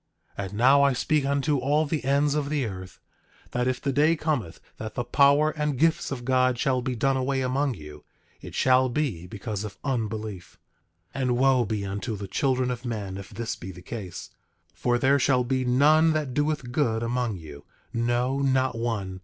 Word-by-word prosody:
10:24 100 - -1
And 95 - -8
now 135 +4 +6
I 140 -1 +4
speak 145 +3 +1
unto 140 +1 +1
all 145 +4 +2
the 155 0 -2
ends 140 +2 +2
of 145 -1 -1
the 145 -4 0
earth—that 95 +5 -7
if 130 -1 0
the 140 - -1
day 150 +4 +4
cometh 145 - -2 0.2
that 110 0 -7
the 120 - -1
power 140 +4 +4
and 150 -3 -2
gifts 165 +4 +2
of 125 -3 -5
God 130 -1 +2
shall 130 0 +1
be 125 0 -2
done 135 +4 +1
away 130 +1 0
among 130 +1 0
you, 75 -3 -11 0.4
it - - -9
shall 130 0 +4
be 120 - -2
because 105 +1 -5
of 105 - -7
unbelief. 110 -7 -4 0.6
10:25 135 - -2
And 125 -2 +1
wo 130 -1 +4
be 105 -1 -2
unto 100 +4 -4
the 100 -1 -6
children 130 +4 0
of 120 0 -5
men 105 -6 -4
if 95 -1 -8
this 115 0 -4
be 95 - -8
the 90 0 -13
case; 100 -5 -7 0.4
for 120 -1 0
there 135 +3 +3
shall 130 -1 +3
be 130 +1 0
none 150 +6 +4
that 150 -5 -2
doeth 145 -3 -1
good 115 -5 0
among 120 -3 -1
you, 75 -4 -11 0.3
no 120 +3 0
not 130 -2 +1
one. 105 -5 -3
125 Hz, 195 wpm, -26 LUFS, 110-140 Hz, 0.6 s, now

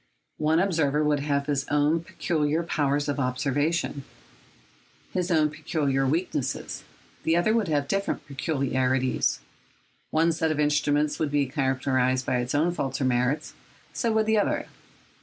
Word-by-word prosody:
One 155 +2 +3
observer 160 -6 +1
would 150 -1 +2
have 140 -1 0
his 140 -2 0
own 150 +3 +2
peculiar 160 -1 -1
powers 145 -3 0
of 145 0 -1
observation, 140 +4 -1 1.1
his 180 -1 -1
own 155 -3 +3
peculiar 145 -4 0
weaknesses: 145 -3 -2 0.4
the 160 +1 +2
other 195 +5 +2
would 225 -4 +1
have 145 -3 0
different 195 +5 -2
peculiarities. 130 -3 0 0.7
One 165 +2 +3
set 160 0 0
of 155 -1 -1
instruments 150 0 +1
would 155 - 0
be 145 -1 +2
characterised 130 -2 0
by 130 - +1
its 125 +2 -2
own 160 +4 +2
faults 135 -6 -3
or 135 - 0
merits, 125 +4 0 0.4
so 230 - 0
would 220 0 +2
the 220 -1 +3
other. 205 - 0
145 Hz, 145 wpm, -26 LUFS, 135-160 Hz, 1.1 s, One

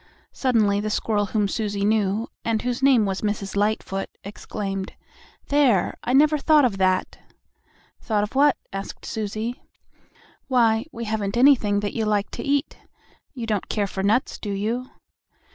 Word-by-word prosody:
Suddenly 220 -6 +2
the 215 +1 -2
squirrel 210 -1 0
whom 210 0 0
Susie 205 -1 -2
knew 215 +1 +1 0.2
and 225 -1 -1
whose 245 +1 -2
name 265 -5 +5
was 195 -1 -2
Mrs. 205 -2 -3
Lightfoot, 200 -1 -1
exclaimed: 195 -1 -5 0.6
"There! 275 -9 +3
I 245 - -1
never 300 +2 +4
thought 300 -1 +5
of 200 -6 -1
that!" 185 -1 +1 0.8
"Thought 210 -2 0
of 210 - -5
what?" 285 +1 +4 0.2
asked 195 0 -6
Susie. 220 +3 -4 0.9
"Why, 235 -1 +2
we 235 -3 -6
haven't 215 -1 -2
anything 235 -6 +4
that 205 - -3
you 225 - -1
like 210 -1 0
to - - -6
eat. 285 +1 -1 0.6
You 240 -3 -4
don't 210 -4 -2
care 210 -2 0
for 190 0 -4
nuts, 215 +6 +1
do 210 - -5
you?" 220 +6 -2
215 Hz, 155 wpm, -23 LUFS, 200-245 Hz, 0.9 s, name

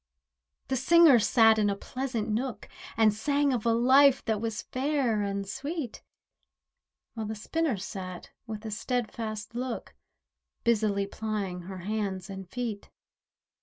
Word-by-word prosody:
The 265 - +1
singer 310 0 +6
sat 225 0 +5
in 205 -1 +3
a 200 - 0
pleasant 245 0 -4
nook, 225 0 -3 0.3
And 220 -2 +5
sang 280 +5 +1
of 235 -2 -1
a - - +5
life 260 +4 +5
that 220 -2 0
was 225 -1 -3
fair 260 -5 0
and 200 -1 -2
sweet, 280 - -5 1.1
While 220 -2 -4
the 220 - -4
spinner 290 +3 -1
sat 185 -2 -7 0.2
with 220 0 -6
a 220 - -4
steadfast 220 -1 -3
look, 245 0 -4 0.7
Busily 210 -4 +2
plying 200 -3 -4
her 190 -2 -7
hands 200 -3 -3
and 190 -2 -8
feet. 230 -4 -4
220 Hz, 135 wpm, -28 LUFS, 205-255 Hz, 1.1 s, singer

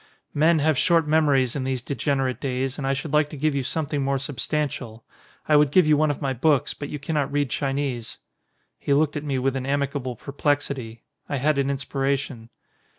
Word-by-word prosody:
"Men 160 +3 +4
have 155 -2 +2
short 165 -3 +3
memories 145 -5 +3
in 140 - -2
these 130 -2 -2
degenerate 135 -2 -1
days, 130 +1 -2
and 135 - -2
I 135 - +2
should 135 +3 -5
like 150 -1 +3
to 150 - -8
give 155 +2 +1
you 140 - 0
something 145 +2 -2
more 135 0 +1
substantial. 135 -4 -3 0.4
I 150 - +4
would 150 -1 +5
give 180 +4 +5
you 155 0 +5
one 155 +1 +2
of 145 +1 -3
my 135 -1 0
books, 140 +2 +2
but 145 - -7
you 150 - -4
cannot 145 -1 -2
read 145 -3 0
Chinese." 135 -4 -2 0.6
He 140 - +1
looked 150 +1 +2
at 145 - -3
me 140 -3 -1
with 135 +1 0
an 130 0 -3
amicable 140 -2 -1
perplexity. 140 -4 -2 0.3
I 145 - -1
had 145 +2 +1
an 140 0 +1
inspiration. 135 -3 -2
140 Hz, 200 wpm, -24 LUFS, 135-150 Hz, 0.6 s, would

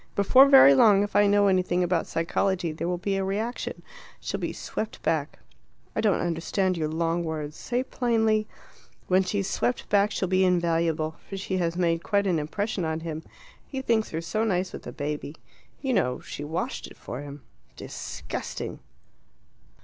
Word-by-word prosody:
Before 260 +7 +6
very 265 - +9
long, 200 +7 +6
if 205 - -5
I 205 0 +6
know 205 0 +4
anything 185 -2 +2
about 175 -1 0
psychology, 175 +1 0
there 160 +2 -4
will 180 0 -1
be 195 +2 -1
a 195 - 0
reaction. 215 +5 -3 0.4
She'll - - -4
be - - -2
swept 215 - -5
back." 155 -2 -1 0.6
"I - - +1
don't 210 -4 +2
understand 175 +3 0
your 160 -2 -1
long 165 +2 -1
words. 155 -2 -4
Say 245 +7 -2
plainly 225 -4 +1 0.3
" - - -29
"When 185 +1 +5
she's 195 +1 -1
swept 245 - -1
back, 205 0 +4
she'll 195 -2 -2
be 185 +1 +3
invaluable. 165 -3 +1
For 195 - -5
she 190 -1 -2
has 170 -1 -1
made 165 -2 +1
quite 200 0 +1
an 175 -4 +2
impression 200 +6 -2
on 160 0 -2
him. 160 -1 -5 0.5
He 265 - -4
thinks 225 -3 +1
her 160 - -3
so 215 +7 -1
nice 185 -4 0
with - - -7
the - - -8
baby. 145 +1 -4 0.5
You 265 -1 0
know, 125 - +1
she 145 - -7
washed 170 - -3
it - - -15
for 125 - -7
him." 145 -1 -9 0.3
"Disgusting!" - - -6
185 Hz, 180 wpm, -26 LUFS, 165-205 Hz, 0.6 s, very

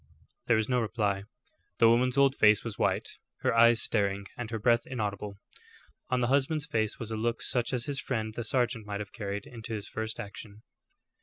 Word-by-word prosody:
There 115 - +5
was 110 -1 +1
no 125 -1 +2
reply; 100 -2 -1 0.5
the 115 - +5
old 115 +1 +6
woman's 135 +2 +3
face 105 -4 +5
was 115 -3 -6
white, - - 0 0.2
her - - +2
eyes 115 0 +6
staring, 100 -2 0
and 120 -2 -5
her 115 - -3
breath 115 +1 +2
inaudible; 105 -4 -4 0.7
on 125 -1 +1
the - - +2
husband's 145 +2 +2
face 110 -8 -1
was 115 -1 -6
a - - -1
look 115 +1 -1
such 120 -2 +1
as 125 -2 -1
his 140 -2 -2
friend 110 -4 -3
the 120 - -4
sergeant 120 -3 0
might 100 -1 -3
have 100 - -8
carried 100 -2 -4
into 115 -2 -7
his 105 -1 -5
first 110 0 -4
action. 105 +1 -9
115 Hz, 200 wpm, -29 LUFS, 105-120 Hz, 0.7 s, old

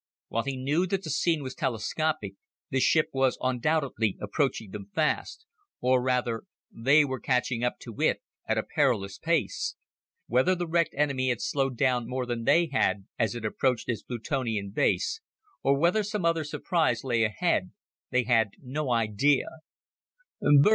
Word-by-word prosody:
While 115 0 -1
he 135 -1 -2
knew 145 +8 +1
that 195 +1 -1
the 155 - -4
scene 150 +1 +1
was 130 -1 -5
telescopic, 120 -1 -1 0.4
the 135 - +1
ship 155 +4 +3
was 135 -1 +2
undoubtedly 130 -4 0
approaching 110 -2 -1
them 100 -1 -8
fast; 160 - -1 0.3
or 130 0 +3
rather, 125 0 0 0.3
they 140 +6 +4
were 130 -2 -3
catching 125 -2 0
up 125 - 0
to 115 - -8
it - - +2 0.2
at - - +1
a - - +1
perilous 100 0 0
pace! 170 - 0 0.5
Whether 155 +9 +3
the 175 0 -2
wrecked 170 -1 +1
enemy 140 -3 +1
had 120 -2 0
slowed 135 -2 -1
down 125 -3 +1
more 130 0 -2
than 120 -1 -3
they 170 +1 +5
had, 120 - 0
as 115 -1 +1
it 115 -2 -5
approached 125 +3 0
its 115 - -1
Plutonian 115 -4 -3
base, 445 - +1 0.4
or 140 0 +3
whether 170 +8 +3
some 205 -3 -3
other 165 -2 +2
surprise 150 -5 0
lay 120 -4 +1
ahead, 110 - +1 0.4
they 125 0 +2
had 115 -3 +2
no 140 +2 -3
idea. 120 +5 +2
130 Hz, 160 wpm, -28 LUFS, 115-155 Hz, 0.5 s, they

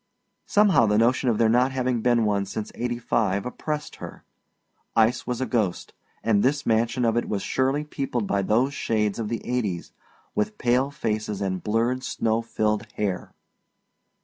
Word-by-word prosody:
Somehow 200 - +4
the 105 0 +3
notion 125 +3 +3
of 110 - +1
there 115 - +4
not 125 +4 +3
having 130 -3 0
been 120 -1 +3
one 100 -2 0
since 105 +2 -5
eighty 120 0 -2
five 100 -4 0
oppressed 150 +4 -4
her. - - -9 0.7
Ice 115 +2 +3
was 125 0 -2
a - - +1
ghost, 110 -6 -1 0.3
and 110 -3 +3
this 140 +4 +1
mansion 115 +2 +1
of 115 -1 +2
it 120 - 0
was 100 -2 -2
surely 135 +3 0
peopled 135 -6 -3
by 100 0 0
those 120 +8 +2
shades 105 -4 0
of 110 -2 -2
the 115 -2 -4
eighties, 105 -9 -2 0.4
with 105 0 -1
pale 125 +3 +2
faces 110 -6 -3
and 95 -2 -2
blurred 115 +4 0
snow 115 -3 0
filled 110 -1 -1
hair. 100 -4 -3
115 Hz, 170 wpm, -25 LUFS, 105-125 Hz, 0.7 s, Somehow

